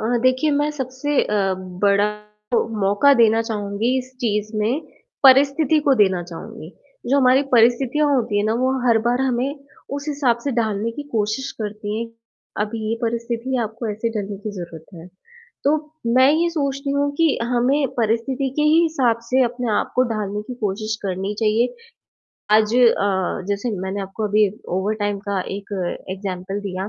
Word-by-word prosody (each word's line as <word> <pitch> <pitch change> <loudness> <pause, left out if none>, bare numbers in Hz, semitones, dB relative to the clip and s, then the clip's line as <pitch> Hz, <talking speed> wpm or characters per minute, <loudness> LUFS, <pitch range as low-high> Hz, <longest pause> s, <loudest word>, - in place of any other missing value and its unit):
अ, 235 +3 0
देखिए, 255 +4 +3
मैं 290 +1 +1
सबसे 270 +1 -1
अ, 195 -2 0 0.3
बड़ा 200 +1 +4 0.4
जो - - +2
मौका 205 +9 +4
देना 225 -2 +4
चाहूँगी 220 +2 -1
इस 255 0 -7
चीज़ 210 -2 -1
में, 230 +8 0 0.4
परिस्थिति 280 +3 +5
को 275 - +6
देना 190 -6 +3
चाहूँगी। 170 -1 -9 0.4
जो 270 - +2
हमारी 260 +1 +5
परिस्थितियाँ 245 +5 +4
होती 225 -5 0
है 205 - +1
ना, 220 +1 +1
वो 255 +2 +1 0.2
हर 230 -2 +5
बार 245 +2 +2
हमें 265 +2 0 0.4
उस 285 +1 -7
हिसाब 280 -5 +1
से 285 - 0
ढालने 220 -1 -1
की 290 - -6
कोशिश 220 +5 -1
करती 210 0 -4
हैं, 235 - -3 0.6
अब 210 - -3
ये 220 0 -2
परिस्थिति 235 +2 -2
है 240 - +1
आपको 225 +2 -5
ऐसे 220 +3 -2
ढलने 200 0 -4
की - - -1
ज़रूरत 170 -3 -8
है। 165 0 -11 0.6
तो 285 - +4 0.5
मैं 260 +2 +6
ये 335 +2 +2
सोचती 280 -3 -2
हूँ 285 0 +1
कि 325 -3 +2
हमें 250 +3 +1
परिस्थिति 235 +5 0
के 300 - +2
ही 310 +2 +5
हिसाब 265 -8 +2
से 260 +1 +4
अपने 245 -1 -2
आप - - -3
को 255 - +5
ढालने 210 -1 -3
की 250 - -5
कोशिश 215 +2 -2
करनी 195 +1 -3
चाहिए। 225 - +2 0.8
आज 220 +1 +2
अ, 200 -7 +2
जैसे 205 +4 -1
मैंने 190 +2 -3
आपको 195 +3 -5
अभी 210 0 +4 0.3
ओवरटाइम 205 0 -1
का 200 -2 0 0.2
एक 200 +1 -10 0.4
एग्जाम्पल 190 0 -4
दिया, 190 0 -4
230 Hz, 170 wpm, -21 LUFS, 205-265 Hz, 0.8 s, को